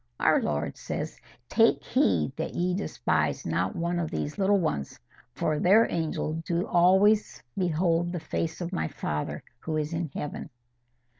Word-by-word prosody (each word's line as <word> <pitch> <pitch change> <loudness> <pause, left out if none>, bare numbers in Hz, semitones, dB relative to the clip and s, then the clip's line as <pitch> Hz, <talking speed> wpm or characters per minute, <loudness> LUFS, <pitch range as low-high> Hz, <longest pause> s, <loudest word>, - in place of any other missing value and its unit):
Our - - +4
Lord 75 0 -2
says, - - -5 0.3
'Take - - +3
heed 80 -6 +1
that - - -4
ye 180 +1 +1
despise 95 - -1
not 90 +3 -1
one 170 +1 -1
of 165 -2 -2
these 150 +7 -4
little 200 +1 +4
ones, 70 - -2 0.4
for 155 -1 0
their 205 +5 +5
angels 160 -1 -1
do 170 +1 -1
always 190 +5 +3
behold 175 -1 +1
the 175 - -3
face 165 +2 -3
of 175 +2 -4
my 175 - -1
Father, 75 - -4 0.2
who 155 -1 -3
is 155 +1 -2
in 165 -1 -2
heaven. 150 - -5
165 Hz, 155 wpm, -27 LUFS, 145-180 Hz, 0.4 s, their